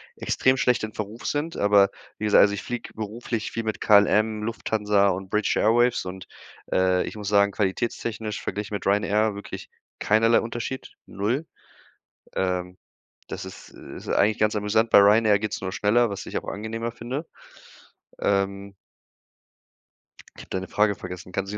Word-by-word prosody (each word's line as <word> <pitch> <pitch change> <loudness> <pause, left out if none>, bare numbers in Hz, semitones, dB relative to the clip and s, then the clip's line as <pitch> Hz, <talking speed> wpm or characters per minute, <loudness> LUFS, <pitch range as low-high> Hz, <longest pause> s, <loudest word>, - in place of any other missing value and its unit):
extrem 130 0 +1
schlecht 125 -2 +2
in 110 0 -4
Verruf 105 +2 -6
sind. 150 +3 -2
Aber 100 -1 +5 0.3
wie 110 - -3
gesagt, 105 - +5
also 100 - +4
ich 100 - -5
fliege 120 -1 -6
beruflich 110 +1 -4
viel 115 - -3
mit 110 -1 -3
KLM, 105 +1 +4
Lufthansa 105 -2 +1
und 95 0 -3
British 105 +1 +1
Airways 120 0 +3
und, 90 0 -7 0.4
äh, 95 0 +2
ich - - -7
muss 105 - -6
sagen, 100 0 +4
qualitätstechnisch 110 +1 -2
verglichen 105 0 -4
mit 100 - -4
Ryanair 105 +1 +2
wirklich 100 - -8 0.3
keinerlei 115 +2 +4
Unterschied, 120 +3 -5
0. 115 +10 -2 0.9
Ähm, 90 -1 -2 0.5
das - - -6
ist - - -11
ist - - -11
eigentlich 105 +1 +2
ganz 105 0 +2
amüsant. 110 +2 +1
Bei - - +8
Ryanair 105 +1 +5
geht's 110 +1 -3
nur 95 -1 -4
schneller, 115 +5 +2
was 100 0 -5
ich - - -2
auch - - -10
angenehmer 115 +3 -4
finde. 130 +8 -5 0.9
Ähm 100 0 -1 1.6
Ich - - -9
hab - - -19
deine 95 0 -3
Frage 105 -1 +2
vergessen, 90 0 -8
kannst 95 +2 -3
du 105 - -4
105 Hz, 160 wpm, -25 LUFS, 100-115 Hz, 1.6 s, Bei